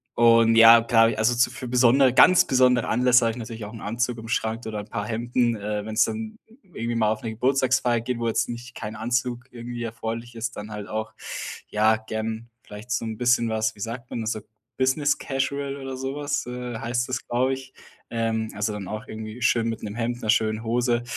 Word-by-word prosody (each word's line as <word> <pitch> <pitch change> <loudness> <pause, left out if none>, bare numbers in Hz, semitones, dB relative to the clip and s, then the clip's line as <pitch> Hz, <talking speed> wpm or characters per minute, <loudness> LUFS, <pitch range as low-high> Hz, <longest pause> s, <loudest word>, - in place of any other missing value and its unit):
und 115 -1 +5
ja, 115 0 +9
klar, 115 0 +4
also 115 +2 +3
so 120 - +2
für 130 - -7
besondere 125 +1 +4
ganz 180 +4 +7
besondere 125 -2 +3
Anlässe 125 0 +4
habe 115 - +2
ich - - -10
natürlich 115 -2 -7
auch 105 - -9
'n 115 - -9
Anzug 120 +3 -2
im 115 0 -9
Schrank 110 0 -2
oder 110 -1 -4
'n 105 - -9
paar 105 - -3
Hemden, 120 +1 0
äh, 105 0 -4
wenn's 110 +1 +2
dann 220 0 -5 0.2
irgendwie 120 -10 -4
mal 110 -2 +2
auf 110 - -3
'ne 115 - -4
Geburtstagsfeier 130 0 +2
geht, 125 +1 -3
wo 115 0 -2
jetzt 115 - 0
nicht 120 0 -7
kein 105 -1 -6
Anzug 120 +2 -2
irgendwie 120 0 -6
erforderlich 115 +1 -5
ist, 120 +1 -4
dann 105 +1 -7
halt 105 -1 -6
auch, 110 0 -4 0.5
ja, 110 +1 +3
gern 110 +1 -5
vielleicht 105 +3 -11
so 115 -1 -1
'n 110 -1 -5
bisschen 120 -1 +3
was, 110 0 -1
wie - - -18
sagt 120 +3 -5
man 115 - -4
es, 110 - -1
so 110 - -3 0.4
Business 130 +3 +1
Casual 140 +1 -2
oder 135 -1 -6
so 135 +1 -4
was, 145 -3 -2
äh, 125 -1 -5
heißt 120 +1 -1
das, 130 0 -3
glaube 130 +2 +1
ich, 130 0 -8 0.4
ähm, 115 -1 -1
also 105 +1 -1
dann 100 -3 -6
auch 110 +4 -5
irgendwie 110 +1 -7
schön 115 0 +2
mit 115 - -5
'nem 105 - -5
Hemd, 120 +1 -2
'ner 110 - +2
schönen 110 0 0
Hose. 120 +1 +1
115 Hz, 215 wpm, -24 LUFS, 110-125 Hz, 0.5 s, ja